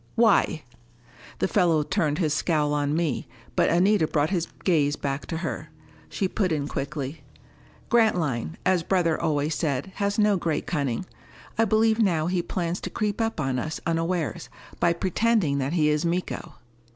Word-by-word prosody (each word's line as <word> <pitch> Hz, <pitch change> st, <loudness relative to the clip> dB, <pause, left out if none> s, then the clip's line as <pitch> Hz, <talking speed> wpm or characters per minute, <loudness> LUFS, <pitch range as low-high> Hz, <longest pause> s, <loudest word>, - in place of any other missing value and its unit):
"Why?" 220 Hz, -8 st, +3 dB, 0.7 s
The -, -, +1 dB
fellow 170 Hz, -6 st, +3 dB
turned 150 Hz, 0 st, 0 dB
his 155 Hz, -5 st, +1 dB
scowl 150 Hz, -2 st, +1 dB
on 145 Hz, 0 st, 0 dB
me, 160 Hz, -4 st, -1 dB, 0.3 s
but -, -, +3 dB
Anita 180 Hz, 0 st, +3 dB
brought 150 Hz, +2 st, 0 dB
his 175 Hz, -4 st, 0 dB, 0.2 s
gaze 150 Hz, -5 st, +2 dB
back 140 Hz, 0 st, -3 dB
to 165 Hz, -, -3 dB
her. -, -, -4 dB, 0.4 s
She 195 Hz, -, -1 dB
put 185 Hz, -1 st, -1 dB
in 145 Hz, -2 st, -1 dB
quickly: 140 Hz, +1 st, -4 dB, 0.7 s
"Grantline, 160 Hz, -, +1 dB
as 185 Hz, -2 st, +3 dB
brother 170 Hz, -2 st, +1 dB
always 150 Hz, 0 st, 0 dB
said, 145 Hz, +2 st, -2 dB
has 200 Hz, 0 st, 0 dB
no 210 Hz, -2 st, +4 dB
great 165 Hz, -3 st, -1 dB
cunning. 140 Hz, -2 st, -1 dB, 0.5 s
I 225 Hz, -, +3 dB
believe 220 Hz, +1 st, +3 dB
now 170 Hz, -8 st, +2 dB
he 180 Hz, +1 st, 0 dB
plans 175 Hz, 0 st, -3 dB
to -, -, -4 dB
creep 210 Hz, 0 st, -2 dB
up 225 Hz, -6 st, -1 dB
on 135 Hz, -3 st, 0 dB
us 155 Hz, +5 st, -4 dB
unawares, 165 Hz, -, -1 dB, 0.3 s
by 170 Hz, -, +3 dB
pretending 185 Hz, -4 st, +1 dB
that 135 Hz, +3 st, -1 dB
he 155 Hz, -3 st, +3 dB
is 150 Hz, 0 st, +1 dB
Miko." 175 Hz, +2 st, -3 dB
165 Hz, 165 wpm, -25 LUFS, 150-190 Hz, 0.7 s, no